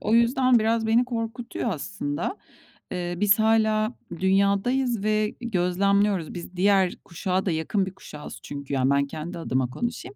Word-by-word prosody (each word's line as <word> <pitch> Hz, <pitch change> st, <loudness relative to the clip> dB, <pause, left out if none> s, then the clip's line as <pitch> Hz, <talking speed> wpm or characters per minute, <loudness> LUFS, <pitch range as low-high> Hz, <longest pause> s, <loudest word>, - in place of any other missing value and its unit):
o 215 Hz, +2 st, +1 dB
yüzden 245 Hz, +1 st, +4 dB
biraz 225 Hz, 0 st, +1 dB
beni 235 Hz, +3 st, +4 dB
korkutuyor 235 Hz, 0 st, -3 dB
aslında. 160 Hz, -, -3 dB, 0.6 s
Eee, 175 Hz, -1 st, -3 dB
biz 205 Hz, +2 st, +4 dB
hâlâ 220 Hz, 0 st, +3 dB, 0.3 s
dünyadayız 200 Hz, +5 st, +2 dB
ve 215 Hz, 0 st, +1 dB
gözlemliyoruz. 195 Hz, -3 st, +1 dB
Biz 175 Hz, +1 st, -8 dB
diğer 190 Hz, -1 st, +3 dB
kuşağa 185 Hz, +2 st, -2 dB
da 185 Hz, -, +1 dB
yakın 165 Hz, +5 st, 0 dB
bir 190 Hz, -, -6 dB
kuşağız 150 Hz, -6 st, -10 dB
çünkü, 140 Hz, -1 st, -6 dB
yani, 130 Hz, 0 st, +2 dB
ben 140 Hz, 0 st, +3 dB
kendi 160 Hz, +4 st, -6 dB
adıma 130 Hz, -5 st, -1 dB
konuşayım. 240 Hz, -, -5 dB
200 Hz, 150 wpm, -25 LUFS, 175-225 Hz, 0.6 s, yüzden